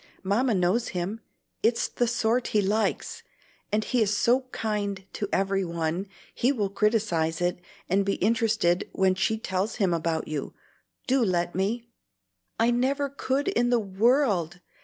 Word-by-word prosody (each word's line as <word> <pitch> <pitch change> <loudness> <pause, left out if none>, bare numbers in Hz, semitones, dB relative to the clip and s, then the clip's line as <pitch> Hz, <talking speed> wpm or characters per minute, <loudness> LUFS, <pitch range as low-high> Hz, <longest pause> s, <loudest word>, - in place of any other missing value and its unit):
Mamma 220 +5 +2
knows 185 +6 +1
him; 190 +6 -3 0.4
it's 230 +1 +2
the 240 - -1
sort 235 +1 +1
he 210 - +2
likes, 210 +3 -1 0.5
and 215 +1 +1
he 245 +3 0
is 205 -1 +2
so 250 +3 +3
kind 205 -3 -2
to 205 - -3
every 195 0 +1
one, 170 +2 -2 0.3
he 250 - +2
will 210 -8 -1
criticise 200 -7 +1
it, 175 0 0 0.3
and 195 +3 +2
be 195 0 0
interested 215 -4 +1
when 190 -1 +3
she 190 +4 0
tells 195 0 -2
him 195 -6 +1
about 165 -1 -1
you. 150 -3 -4 0.5
Do 260 -1 +2
let 175 -4 0
me!" 215 +6 -1 0.7
"I 230 +1 +4
never 275 +4 +1
could 275 +3 -1
in 245 -11 +1
the 245 - +4
world! 200 - +1
205 Hz, 155 wpm, -26 LUFS, 185-235 Hz, 0.7 s, I